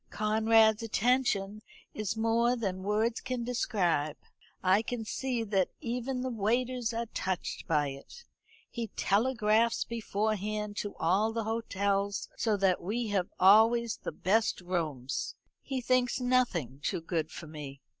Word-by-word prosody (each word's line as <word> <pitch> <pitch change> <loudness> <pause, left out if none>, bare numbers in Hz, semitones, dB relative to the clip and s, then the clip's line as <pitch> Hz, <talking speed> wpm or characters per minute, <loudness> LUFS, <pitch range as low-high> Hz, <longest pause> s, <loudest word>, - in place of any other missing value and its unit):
Conrad's 220 0 +3
attention 215 -3 +1 0.3
is 215 0 -3
more 230 +2 +2
than 195 -6 -3
words 215 +4 0
can 255 -2 -3
describe. 180 -11 0 0.5
I 190 +3 +4
can 230 -1 -4
see 245 +1 -2
that 200 -4 +1
even 250 +2 -3
the 260 0 -2
waiters 240 +2 0
are 230 0 -2
touched 190 -5 -4
by 150 -3 +2
it. 140 - -11 0.5
He 235 -2 -3
telegraphs 225 +1 +2
beforehand 215 -2 -2
to 205 - -4
all 195 +7 +2
the 225 0 -2
hotels, 200 -3 -1
so 220 -3 +1
that 190 -2 +2
we 220 +5 -2
have 195 -3 0
always 225 +4 +5
the - - -5
best 215 +4 +1
rooms. 155 -8 -3 0.3
He 265 -2 -3
thinks 250 +1 +1
nothing 245 - +1
too 165 - -2
good 160 -2 -2
for 170 - -9
me. 150 -3 -8
215 Hz, 135 wpm, -30 LUFS, 190-235 Hz, 0.5 s, always